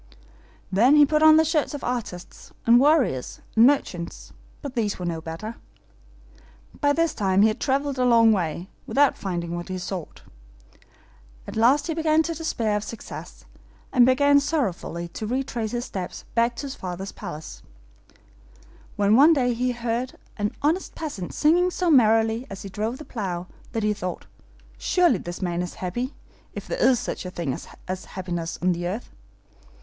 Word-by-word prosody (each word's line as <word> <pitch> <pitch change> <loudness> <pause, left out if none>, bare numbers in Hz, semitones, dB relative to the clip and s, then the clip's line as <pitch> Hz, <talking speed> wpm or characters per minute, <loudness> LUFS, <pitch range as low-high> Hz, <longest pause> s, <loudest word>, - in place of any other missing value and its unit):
Then 235 +9 +5
he 295 -1 +8
put 305 +2 +1
on 315 0 +8
the 320 - +5
shirts 305 -2 0
of 285 - -7
artists, 230 -8 -5
and 235 +1 +7
warriors, 270 - +2 0.2
and 225 +2 +7
merchants; 180 -12 -2 0.3
but 280 -3 -5
these 220 -5 -1
were 180 - -5
no 165 -2 -3
better. 165 +8 -6 1.2
By 285 - +3
this 330 +1 +1
time 195 -1 +2
he 220 - +6
had 215 - -4
traveled 275 0 0
a - - +3
long 230 -2 +6
way, 175 -3 -1 0.2
without 285 0 +3
finding 175 -3 -4
what 175 +2 -6
he 185 - -3
sought. 180 -2 -6 1.2
At - - -8
last 245 +6 +4
he 330 - -2
began 320 0 +2
to 335 - -3
despair 235 -10 -1
of 210 - -1
success, 230 - -9 0.5
and 250 - +6
began 285 +3 +5
sorrowfully 230 - -2
to 215 +5 -6
retrace 245 -2 -2
his 240 +2 -3
steps 185 -2 -6
back 235 +1 +2
to - - -5
his 275 - -5
father's 185 -1 -6
palace, 150 - -8 1.3
when 205 +1 +3
one 295 +6 +7
day 250 -5 +2
he 250 +2 0
heard 240 +1 -3 0.2
an 205 0 -1
honest 325 +6 0
peasant 280 - -5
singing 345 +4 +3
so 360 -1 0
merrily 225 -2 +4
as 195 - -8
he 195 - -7
drove 220 +5 -3
the 305 - -10
plow, 185 -6 -4 0.3
that 225 -2 -1
he 210 0 +2
thought, 185 -3 -5 0.5
'Surely 350 - +3
this 175 +2 -6
man 175 -1 -1
is 180 - -5
happy, 240 +9 -4 0.4
if - - -7
there - - -3
is 260 - +4
such - - -4
a 180 - -5
thing 170 -7 -3 0.3
as 185 0 -4
happiness 175 -3 -4
on 180 -1 +3
earth. 190 +7 -4
230 Hz, 170 wpm, -24 LUFS, 185-280 Hz, 1.3 s, he